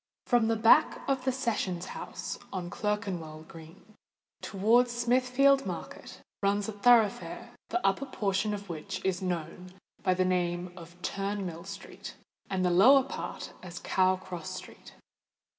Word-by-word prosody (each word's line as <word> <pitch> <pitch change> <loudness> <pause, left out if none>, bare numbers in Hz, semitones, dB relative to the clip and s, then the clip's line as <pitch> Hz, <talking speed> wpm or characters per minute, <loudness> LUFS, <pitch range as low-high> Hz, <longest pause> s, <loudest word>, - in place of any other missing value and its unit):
From 240 -2 +3
the 225 - +2
back 225 +7 +4
of 265 -2 0
the 260 - +3
Sessions 215 -9 -2
House - - -6
on 175 -2 -4
Clerkenwell 185 -8 -3
Green, 165 +6 -14 0.5
towards 230 +5 +3
Smithfield 255 +3 +3
Market, - - -7 0.2
runs 200 0 +1
a - - -2
thoroughfare 220 0 +2 0.2
the 360 - -1
upper 195 +8 +1
portion 205 -3 0
of 200 0 -9
which 160 0 -6
is 190 -1 0
known 180 0 -4 0.3
by 185 - +2
the 185 0 +2
name 175 -1 -1
of 175 0 -12
Turnmill 195 -3 -3
Street, 195 -1 -9 0.3
and 185 -1 0
the 180 - +3
lower 255 +10 +7
part 270 - -6
as 175 -1 -9
Cow 185 +1 +2
Cross 185 -1 -7
Street. 185 - -11
195 Hz, 140 wpm, -29 LUFS, 180-230 Hz, 0.5 s, lower